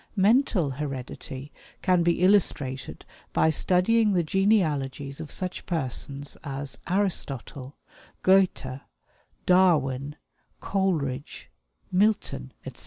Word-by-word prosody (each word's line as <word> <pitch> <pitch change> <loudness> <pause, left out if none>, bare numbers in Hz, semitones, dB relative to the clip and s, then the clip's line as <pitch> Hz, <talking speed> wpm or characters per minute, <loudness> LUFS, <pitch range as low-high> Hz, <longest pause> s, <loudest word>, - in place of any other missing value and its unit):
"Mental 200 - +3
heredity 135 0 -6 0.3
can 180 -2 +3
be 170 +1 +1
illustrated 145 -9 +1 0.3
by 160 - +3
studying 205 +7 +3
the 175 -2 +2
genealogies 155 -7 0
of 155 - -8
such 185 -1 -5
persons 140 -3 -3
as 135 -3 -5
Aristotle, 145 - -2 0.5
Goethe, 185 -9 +2 0.6
Darwin, 150 -7 +3 0.4
Coleridge, 150 - -2 0.4
Milton, 195 - +1
etc. - - -8
160 Hz, 90 wpm, -26 LUFS, 135-190 Hz, 0.6 s, Mental